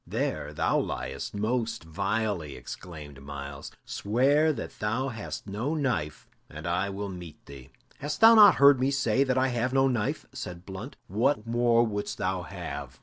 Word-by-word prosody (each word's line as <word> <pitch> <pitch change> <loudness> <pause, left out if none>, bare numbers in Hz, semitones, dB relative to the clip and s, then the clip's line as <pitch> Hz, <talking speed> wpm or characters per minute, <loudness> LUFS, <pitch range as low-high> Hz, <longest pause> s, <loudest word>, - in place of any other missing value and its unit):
"There 75 -1 -2
thou 75 - +1
liest - - -4
most 110 0 -1
vilely!" 95 -3 -2
exclaimed 75 -6 -9
Myles. 70 0 -7 0.2
"Swear 140 +9 +2
that 150 - -7
thou 115 +6 -1
hast 110 -4 -6
no 110 +10 -2
knife, 100 - -2 0.2
and 75 +1 -9
I 90 +3 0
will 100 +1 -4
meet 90 -4 -10
thee." 70 -2 -12 0.3
"Hast 150 +1 -4
thou 225 +1 +9
not 215 -2 +9
heard 140 -1 +7
me 130 +1 +2
say 135 -2 +2
that 130 -1 0
I 130 +1 +3
have 125 +1 -1
no 135 0 +4
knife?" 115 -5 -1
said 90 0 -7
Blunt. 105 +8 -7
"What 115 +4 +1
more 120 0 +3
wouldst 105 -2 -3
thou 95 0 -1
have?" 80 - -7
105 Hz, 165 wpm, -28 LUFS, 85-130 Hz, 0.3 s, thou